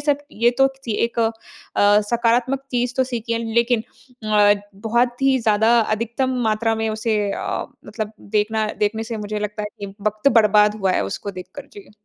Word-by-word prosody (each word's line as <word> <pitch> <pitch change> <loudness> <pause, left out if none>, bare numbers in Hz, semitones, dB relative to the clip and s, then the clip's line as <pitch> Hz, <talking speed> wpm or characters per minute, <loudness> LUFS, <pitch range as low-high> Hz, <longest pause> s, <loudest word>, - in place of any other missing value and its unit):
सब 290 -1 +1
ये 235 +2 +3
तो 270 - +6
किसी 265 -4 -7
एक 235 0 -4
अ, 225 0 +2 0.8
सकारात्मक 240 +3 +1
चीज़ 245 0 -1
तो 260 - +3
सीखी 235 -2 -4
है, 230 - 0 0.2
लेकिन 235 -1 +2 0.5
अ, 205 -1 +6 0.2
बहुत 240 +5 0
ही 270 -1 +4
ज़्यादा 225 +1 +3
अधिकतम 235 +4 -1
मात्रा 225 +1 +1
में 220 0 -1
उसे 220 0 -1
अ, - - -3 0.2
मतलब 215 0 -5 0.2
देखना 215 +1 +1
देखने 215 +1 0
से 225 0 -5
मुझे 210 0 -4
लगता 210 0 -4
है 210 - -3
कि 200 -1 -7
वक़्त 215 +5 +1
बर्बाद 210 -1 +4
हुआ 190 -1 +2
है 100 - +1
उसको 200 - -5
देखकर। 230 +10 -10
जी। 405 -1 -13
225 Hz, 180 wpm, -21 LUFS, 210-240 Hz, 0.8 s, तो